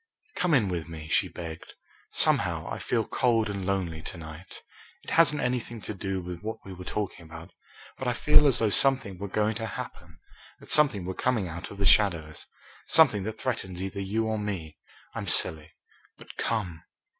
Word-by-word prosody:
"Come 180 -5 +2
in 115 -7 +3
with 85 -3 -3
me," 80 -2 -8
she - - +3
begged. 80 -2 -8 0.3
"Somehow, - - +2
I - - -4
feel 115 -3 0
cold 115 -3 +1
and 100 -1 -4
lonely 90 -4 -1
to 85 - -8
night. 80 +2 -10 0.4
It - - -8
hasn't 150 -4 +4
anything 125 -2 -2
to 110 - -5
do 95 -1 -3
with 90 -1 -7
what 110 +2 -4
we 95 - -8
were 90 0 -9
talking 100 -4 -4
about, 85 +1 -11 0.5
but 130 - -3
I 125 - +2
feel 150 +4 +5
as 135 - +5
though 110 -2 +2
something 130 -7 +3
were 100 - -4
going 105 +2 +1
to 115 -1 -3
happen, 100 - -8 0.4
that - - -8
something 135 -12 +3
were 95 - -3
coming 115 -3 0
out 85 0 -7
of 100 - -10
the 100 - -1
shadows, 85 -8 +3 0.4
something 105 - +6
that 110 0 -5
threatens 95 -8 -3
either 95 +1 -4
you 105 +4 -1
or 110 -1 -1
me. 95 -7 -4 0.4
I'm - - -5
silly, 80 -1 +1 0.5
but - - -13
come." 90 -8 -2
100 Hz, 190 wpm, -28 LUFS, 85-115 Hz, 0.5 s, something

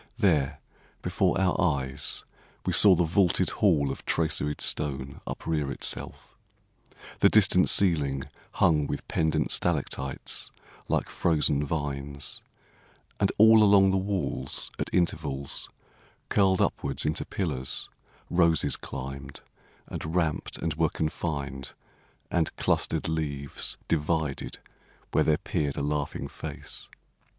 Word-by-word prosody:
There 80 - +2 0.4
before - - +1
our 95 -2 +1
eyes 70 -5 0 0.4
We - - 0
saw 100 -3 +9
the 90 - +2
vaulted 85 +2 +2
hall 75 -9 +2
of - - -7
traceried 75 -2 0
stone 70 -2 -1
Uprear 75 -4 -2
itself, - - -6 0.8
the - - +6
distant 95 -3 +5
ceiling 75 -8 +3 0.3
hung 75 -4 +3
With - - -5
pendent 80 -1 0
stalactites 70 -5 -1 0.4
like - - 0
frozen 75 -3 +1
vines; 70 -2 -4 0.8
And - - +2
all 110 +1 +7
along 100 -2 +6
the 95 - +2
walls 95 -8 -2
at - - -2
intervals, 75 -6 -1 0.6
Curled 95 -2 +3
upwards 70 -1 -1
into 75 - 0
pillars, 70 -9 -1 0.4
roses 85 -2 +2
climbed, 70 +1 -7 0.4
And 80 +2 -6
ramped 80 -4 -1
and 80 - -2
were 80 +1 +1
confined, 70 -4 -3 0.6
and 85 -2 0
clustered - - 0
leaves 70 -4 -2
Divided 80 -2 -1 0.5
where - - +3
there 75 -1 +3
peered 70 -2 -2
a - - -1
laughing 75 0 -2
face. - - -8
75 Hz, 115 wpm, -27 LUFS, 70-85 Hz, 0.8 s, saw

